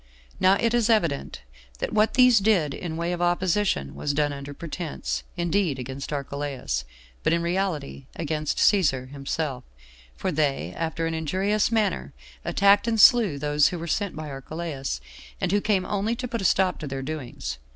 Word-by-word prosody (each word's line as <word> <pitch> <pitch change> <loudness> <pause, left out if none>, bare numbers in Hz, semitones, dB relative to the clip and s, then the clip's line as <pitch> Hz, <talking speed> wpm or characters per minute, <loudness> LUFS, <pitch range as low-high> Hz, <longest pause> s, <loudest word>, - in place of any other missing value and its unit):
Now 190 +1 +5
it 230 +3 +1
is 240 -1 +2
evident 170 -11 0 0.3
that - - -3
what 215 +1 +3
these 250 -3 +7
did 190 -9 +2
in 160 0 -5
way 170 +1 -1
of 175 - -4
opposition 175 - +1
was 145 -1 -2
done 145 -1 +1
under 140 0 -7
pretense, 155 +1 -4 0.2
indeed, 175 -3 +1
against 130 +3 -6
Archelaus, 140 - -3 0.4
but - - +2
in 170 0 +1
reality 170 -7 -2
against 155 -2 -2
Cæsar 140 -11 +3
himself, 140 -1 -3 0.5
for 190 - -2
they, 140 - 0
after 165 0 -2
an 165 - -1
injurious 190 +8 0
manner, 205 - 0 0.3
attacked 200 +2 +4
and 225 -1 +1
slew 215 - +6
those 145 0 +3
who 180 - -3
were 165 - -5
sent 200 +3 -1
by 155 -1 -6
Archelaus, 135 - -5 0.4
and - - 0
who 205 +1 +2
came 200 -3 +1
only 210 +3 -1
to 250 +1 -4
put 230 -2 -3
a - - -3
stop 185 +1 +2
to 155 - -5
their 135 -1 -4
doings. 125 - -5
165 Hz, 170 wpm, -25 LUFS, 140-200 Hz, 0.5 s, these